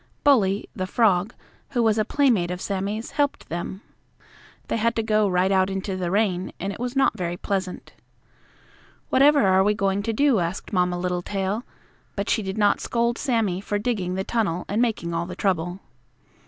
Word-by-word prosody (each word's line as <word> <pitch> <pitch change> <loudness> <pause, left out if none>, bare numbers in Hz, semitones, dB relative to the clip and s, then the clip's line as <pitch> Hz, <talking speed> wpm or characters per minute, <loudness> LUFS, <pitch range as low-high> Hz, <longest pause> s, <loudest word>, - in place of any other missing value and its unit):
Bully, 210 -9 +3
the 185 -1 -3
frog, 200 -1 +2 0.4
who 240 -3 +2
was 220 -1 +3
a - - +3
playmate 230 -9 +2
of 180 0 -4
Sammie's, 200 +4 -3
helped 285 -2 -1
them. 175 +4 -5 0.8
They - - -1
had 230 +1 +1
to 225 - 0
go 215 -1 +2
right 185 +1 +2
out 190 0 +3
into 195 0 -3
the 180 -2 -2
rain, 190 -2 0
and 195 +2 -3
it - - -10
was 245 +2 -3
not 270 -4 +3
very 175 -3 -3
pleasant. 190 -2 -4 1.2
"Whatever 285 -2 +5
are 190 0 +4
we 210 +1 +2
going 195 -1 0
to 225 +3 -2
do?" 260 0 +3
asked 175 +5 -4
Mamma 180 -1 +1
Littletail, 190 +4 -2 0.5
but 200 0 -2
she 220 - +2
did 190 0 -4
not 205 -1 +3
scold 235 0 0
Sammie 220 -9 0
for 205 +1 -2
digging 205 -5 -2
the 190 - -1
tunnel 195 -6 -1
and 210 +3 0
making 210 -8 -1
all 165 +1 -2
the 180 - -7
trouble. 175 -1 -1
200 Hz, 180 wpm, -24 LUFS, 185-225 Hz, 1.2 s, Whatever